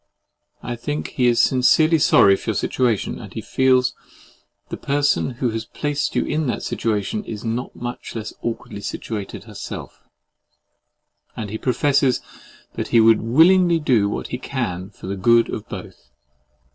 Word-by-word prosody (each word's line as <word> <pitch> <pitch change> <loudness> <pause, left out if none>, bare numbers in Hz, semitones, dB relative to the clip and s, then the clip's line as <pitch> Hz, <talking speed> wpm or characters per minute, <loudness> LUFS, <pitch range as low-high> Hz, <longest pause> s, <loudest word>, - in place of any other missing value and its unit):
I 120 - -4
think 145 +6 -4
that - - -7
he 125 -4 +1
is 120 -1 +3
sincerely 155 +6 +4
sorry 100 -8 +6
for - - -6
your - - 0
situation; 120 -5 0
and - - -10
he - - -5
feels 130 -1 +2
that - - -28
the - - -5
person 145 0 +2
who 120 -1 -1
has 110 0 -3
placed 145 +4 -2
you - - +1
in 155 0 -1
that 120 - -2
situation 110 - -2
is 110 - -7
not 115 +3 -3
much 120 0 -6
less 110 -1 -5
awkwardly 115 -3 -5
situated 100 -2 -5
herself; 105 -2 -8 1.4
and 105 -3 -5
he 110 - -4
professes 135 +1 +2 0.5
that - - -4
he 115 - +4
would 110 0 +5
willingly 170 +8 +5
do 120 -10 +2
what - - -4
he 125 - -4
can 95 -9 -4
for 105 - -13
the 95 +1 -3
good 115 +4 +3
of 105 - -6
both. - - -9
120 Hz, 165 wpm, -21 LUFS, 110-140 Hz, 1.4 s, sorry